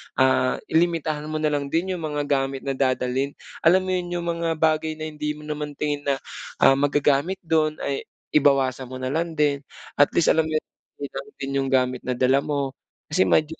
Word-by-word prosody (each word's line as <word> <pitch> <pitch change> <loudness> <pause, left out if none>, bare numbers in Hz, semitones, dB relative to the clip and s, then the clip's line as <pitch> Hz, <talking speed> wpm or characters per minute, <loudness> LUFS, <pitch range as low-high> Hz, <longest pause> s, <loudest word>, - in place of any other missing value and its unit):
ah, 130 -1 +3 0.2
i-limitahan 160 -2 +1
mo 155 - -4
na 155 -1 +1
lang 145 -1 -1
din 170 +6 0
'yung - - -6
mga 150 -1 -1
gamit 135 -2 -1
na 135 - -1
dadalhin. 130 +1 0 0.3
Alam 185 +3 +5
mo 185 - -4
yun, 180 -1 -1
'yung 175 - -2
mga 165 -1 -1
bagay 155 0 +1
na 155 - -7
hindi 150 0 -3
mo 150 - -12
naman 150 -1 -5
tingin 145 -1 -2
na, 140 - +3 0.5
ah, - - +8
magagamit 145 +4 +2
do'n, 155 -2 +2
ay 140 - -3 0.2
i - - +5
bawasan 135 -2 +2
mo 130 - -8
na 130 0 -3
lang 165 +2 -1
din. 145 -2 +2 0.4
At 145 - +7
least, 170 - +4
alam 160 -1 +2
niyo 155 - -2
na - - -67 0.4
'yun 140 - -5
lang 135 +1 -5
din 135 0 -5
'yung 135 - 0
gamit 125 -1 +2
na 125 - +1
dala 130 +2 +3
mo. 140 -1 -2 0.4
Kasi 185 +4 +3
medyo 155 +1 +2
150 Hz, 210 wpm, -24 LUFS, 135-160 Hz, 0.5 s, ah